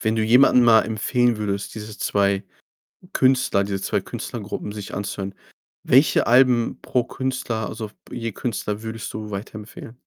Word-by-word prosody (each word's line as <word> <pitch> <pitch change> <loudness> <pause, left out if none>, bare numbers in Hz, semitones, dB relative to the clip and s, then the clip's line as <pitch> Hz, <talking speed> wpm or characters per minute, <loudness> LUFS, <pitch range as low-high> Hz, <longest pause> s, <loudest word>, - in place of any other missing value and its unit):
Wenn 110 0 0
du 110 - +1
jemanden 125 +2 +6
mal 115 -2 +6
empfehlen 120 +2 +1
würdest, 100 -2 -3
diese 110 -1 -8
2 100 -1 +1 0.7
Künstler 130 -7 +3
diese 100 -1 -3
2 - - 0
Künstlergruppen 105 - -6
sich 105 -1 -7
anzuhören, 100 -1 -4 0.5
welche - - +4
Alben 120 -1 +4
pro 125 -2 0
Künstler, 125 -5 -3
also 110 0 -5
f 105 - -23 0.2
je 115 -2 -4
Künstler 105 -1 -3
würdest 110 0 -6
du 110 -1 -6
weiterempfehlen? 105 +2 -8
110 Hz, 150 wpm, -23 LUFS, 100-120 Hz, 0.7 s, jemanden